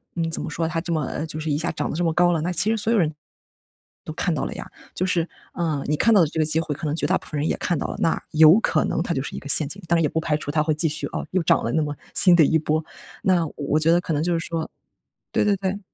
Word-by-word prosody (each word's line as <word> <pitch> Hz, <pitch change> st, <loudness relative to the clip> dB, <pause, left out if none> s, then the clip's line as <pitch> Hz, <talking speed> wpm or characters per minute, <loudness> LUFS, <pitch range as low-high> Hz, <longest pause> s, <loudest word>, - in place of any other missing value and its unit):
嗯， 165 Hz, -1 st, -2 dB
怎 -, -, 0 dB
么 170 Hz, -, -5 dB
说 165 Hz, +1 st, -2 dB
它 165 Hz, 0 st, -2 dB
这 170 Hz, -1 st, -3 dB
么 155 Hz, -2 st, 0 dB
呃， 150 Hz, -, -4 dB
就 155 Hz, 0 st, -5 dB
是 155 Hz, 0 st, -2 dB
一 145 Hz, -, +1 dB
下 170 Hz, -, -1 dB
涨 -, -, -3 dB
得 -, -, -4 dB
这 175 Hz, -, 0 dB
么 165 Hz, -, +1 dB
高 175 Hz, +1 st, +3 dB
了， 165 Hz, -, 0 dB
那 175 Hz, +3 st, -2 dB
其 195 Hz, +6 st, +2 dB
实 225 Hz, -, 0 dB
所 220 Hz, +1 st, +2 dB
有 230 Hz, -, +3 dB
人， 155 Hz, -2 st, +1 dB, 0.9 s
都 -, -, -6 dB
看 -, -, -1 dB
到 -, -, -2 dB
了 -, -, -5 dB
呀。 -, -, -8 dB, 0.3 s
就 185 Hz, -, -1 dB
是， 175 Hz, -3 st, 0 dB, 0.3 s
啊， 155 Hz, -5 st, -2 dB
你 150 Hz, -, +1 dB
看 230 Hz, -, +3 dB
到 200 Hz, -, +6 dB
的 160 Hz, -, +3 dB
这 160 Hz, -, -5 dB
个 155 Hz, -, +3 dB
机 155 Hz, +1 st, +2 dB
会， 155 Hz, -2 st, -2 dB
可 155 Hz, +3 st, -7 dB
能 150 Hz, -, -1 dB
绝 -, -, -1 dB
大 -, -, +2 dB
部 -, -, -15 dB
分 150 Hz, -, -5 dB
人 150 Hz, -, -1 dB
也 -, -, -1 dB
看 175 Hz, -, -1 dB
到 -, -, -3 dB
了。 -, -, -6 dB
那 165 Hz, -, 0 dB
有 160 Hz, +4 st, +7 dB
可 155 Hz, -, +1 dB
能 160 Hz, -, -1 dB
它 175 Hz, -, -2 dB
就 135 Hz, -, -1 dB
是 -, -, -7 dB
一 -, -, -5 dB
个 140 Hz, -, -10 dB
陷 150 Hz, +1 st, +5 dB
阱。 195 Hz, +7 st, -7 dB
当 170 Hz, -, +4 dB
然 -, -, +2 dB
也 150 Hz, -, +3 dB
不 160 Hz, -, -1 dB
排 155 Hz, -2 st, 0 dB
除 145 Hz, -, -5 dB
它 150 Hz, 0 st, +1 dB
会 155 Hz, 0 st, +1 dB
继 160 Hz, +2 st, +2 dB
续 155 Hz, -, -3 dB
哦， -, -, -5 dB
又 185 Hz, -2 st, 0 dB
涨 -, -, +3 dB
了 115 Hz, -, -1 dB
那 160 Hz, -, +2 dB
么 145 Hz, -, -3 dB, 0.2 s
新 180 Hz, -, +6 dB
的 160 Hz, -4 st, +6 dB
一 160 Hz, -, +3 dB
波。 155 Hz, 0 st, -1 dB, 0.4 s
那 180 Hz, -3 st, +2 dB
我 -, -, -12 dB
我 150 Hz, +1 st, 0 dB
觉 160 Hz, +1 st, +3 dB
得 175 Hz, -, +4 dB
可 165 Hz, -, -3 dB
能 150 Hz, +1 st, 0 dB
就 175 Hz, 0 st, 0 dB
是 -, -, -6 dB
说 165 Hz, -1 st, -3 dB, 0.6 s
对 -, -, +1 dB
对 205 Hz, -, +3 dB
对。 195 Hz, +1 st, -3 dB
160 Hz, 360 characters per minute, -23 LUFS, 155-175 Hz, 0.9 s, 有